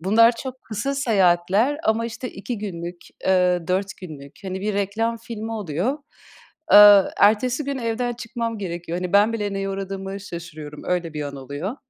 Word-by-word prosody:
bunlar 225 +6 +5
çok 260 -1 -7
kısa 230 +6 -3
seyahatler 205 0 +2
ama, 225 +1 +1
işte, 240 +2 -6
2 215 +3 -6
günlük, 175 -3 -6 0.2
eee, 180 -2 +3
4 190 +1 -1
günlük. 145 -6 -10
Hani, 190 0 -4
bir 210 +1 -2
reklam 220 +4 -1
filmi 225 -1 -6
oluyor, 210 - -2 0.7
aaa, 205 -1 +9
ertesi 245 +7 +3
gün 280 -1 -3
evden 240 +1 -1
çıkmam 230 -1 -4
gerekiyor. 175 -2 -4
Hani, 180 0 -4
ben 205 +3 +5
bile 205 -3 -2
neye 195 0 -2
uğradığımı 195 0 -5
şaşırıyorum. 155 -5 -8
Öyle 175 -3 -2
bir 150 - -3
an 140 -1 -6
oluyor. 145 - -5
200 Hz, 160 wpm, -23 LUFS, 180-230 Hz, 0.7 s, aaa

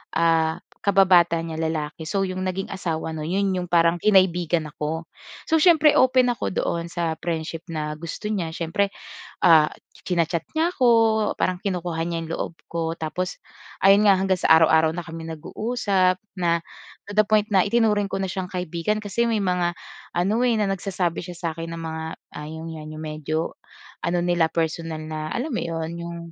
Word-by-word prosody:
ah, 165 0 +2 0.2
kababata 180 -4 +4
niya 160 -1 -5
lalaki. 160 0 -3
So 195 +4 0
'yong 185 0 -3
naging 185 +1 -3
asawa 165 -4 -3
no'n, 155 -1 -5
'yon 200 +2 +1
'yong 180 -1 -4
parang 170 0 +4
kinaibigan 175 -5 +3
ako. 155 +2 -4 0.4
So 320 - +4
siyempre 315 -3 +6
open 255 -1 +4
ako 220 - -4
doon 170 0 -1
sa 165 -2 -2
friendship 165 0 -4
na 150 -2 -3
gusto 170 +6 -6
niya. 175 -6 -1
Siyempre, 185 +4 0 0.6
ah, 160 -3 +7 0.4
china-chat 170 -2 0
niya 335 +2 +2
ako, 255 -8 +1 0.5
parang 185 -1 0
kinukuha 175 -4 -2
niya 170 0 -2
'yong 160 - -9
loob 170 - -3
ko. 165 -1 -2
Tapos 180 +4 -3 0.5
ayun 200 +2 +7
nga, 195 - +7
hanggang 190 -1 0
sa - - +1
araw-araw 160 0 +5
na 175 - -4
kami 165 0 -8
nag-uusap 195 +1 0 0.2
na 170 -1 +2 0.5
to - - -5
the 215 - +6
point 210 0 +2
na 190 -2 +5
itinuring 210 -1 +2
ko 195 - -3
na 190 - -1
siyang 185 -1 -4
kaibigan 180 +4 -2
kasi 215 +3 -1
may 220 -2 +1
mga 180 -2 +1 0.4
ano 205 +8 +2
eh, 240 -3 +3
na 210 - +2
nagsasabi 185 -3 -2
siya 180 -1 -8
sa'kin 165 -1 -4
ng 165 - -6
mga 160 0 -4 0.3
,ah, 150 0 -6
'yon 160 +1 -7
nga 160 -1 -8
'yong 155 0 -8
medyo 155 +1 -3 0.5
ano 175 0 0
nila, 175 -2 +2
personal 165 -1 -2
na 155 0 -4
alam 265 +7 -2
mo 235 - -1
'yon 165 -1 -3
'yong 170 0 -6
175 Hz, 180 wpm, -24 LUFS, 160-195 Hz, 0.6 s, ah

